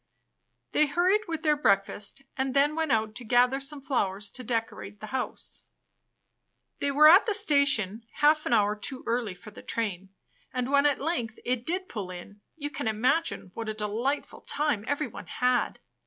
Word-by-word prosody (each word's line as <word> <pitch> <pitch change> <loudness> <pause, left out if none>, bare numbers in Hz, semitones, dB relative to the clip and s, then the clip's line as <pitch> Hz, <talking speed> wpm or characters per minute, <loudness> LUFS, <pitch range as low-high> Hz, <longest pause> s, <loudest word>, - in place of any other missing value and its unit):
They 305 - +3
hurried 370 +8 +2
with 325 -2 -4
their 305 -1 +4
breakfast, 205 0 0
and 265 0 -2
then 285 +2 +4
went 320 -3 0
out 220 -1 +1
to 240 +2 -8
gather 245 +3 +3
some 280 +1 -4
flowers 205 -7 -1
to 255 - -6
decorate 225 -3 -3
the 215 - -7
house. 260 -1 -3 1.2
They 285 - 0
were 295 +2 +7
at 365 +9 +8
the 425 - +2
station 270 - +2
half 305 +1 +3
an - - -2
hour 210 -2 +3
too 255 +5 -5
early 230 -5 -1
for 210 +4 -12
the - - -12
train, 195 -4 -3 0.4
and 250 +1 -2
when 280 +1 +5
at 285 - +1
length 255 -7 -2
it 245 -1 -1
did 370 +3 -1
pull 205 -5 -5
in, 185 +3 -10
you 290 -2 -5
can 255 - -4
imagine 250 - 0
what 225 -1 -5
a 215 - -3
delightful 220 +7 -2
time 295 -8 -1
everyone 290 +2 -3
had. 250 -1 0
255 Hz, 175 wpm, -28 LUFS, 215-295 Hz, 1.2 s, at